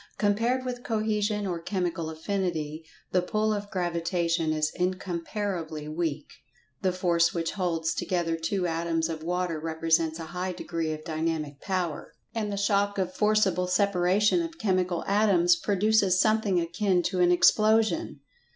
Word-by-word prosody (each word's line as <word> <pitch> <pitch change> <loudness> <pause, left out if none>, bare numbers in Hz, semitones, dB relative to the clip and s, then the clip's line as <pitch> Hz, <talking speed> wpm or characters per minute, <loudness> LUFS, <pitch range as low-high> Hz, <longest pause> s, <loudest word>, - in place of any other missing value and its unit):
Compared 230 +5 +1
with 245 -1 -4
Cohesion 215 -2 -1
or 175 -3 -2
Chemical 170 -2 -2
Affinity, 160 -2 -3 0.3
the 180 - +3
pull 215 +4 0
of 205 -1 -4
Gravitation 170 -3 0
is 155 -1 0
incomparably 180 -3 -3
weak. 155 -1 -2 0.6
The 185 - +2
force 175 -2 +2
which 165 -1 -1
holds 165 -4 -1
together 170 -3 -1
two 180 +3 -1
atoms 165 -1 -1
of 160 -1 -4
water 175 -1 -2
represents 160 0 0
a 165 - -6
high 180 +1 -2
degree 165 -2 -3
of 155 0 -5
dynamic 155 -3 -3
power, 180 -5 -3 0.2
and 215 -3 -2
the 200 - -3
shock 200 0 +1
of 185 -1 -1
forcible 205 -4 +2
separation 200 - +2
of 330 0 -5
chemical 185 - 0
atoms 195 -4 +4
produces 200 -1 +2
something 215 -4 +2
akin 180 +2 0
to 185 +1 -1
an 175 0 +5
explosion. 220 - +3
180 Hz, 140 wpm, -27 LUFS, 165-205 Hz, 0.6 s, an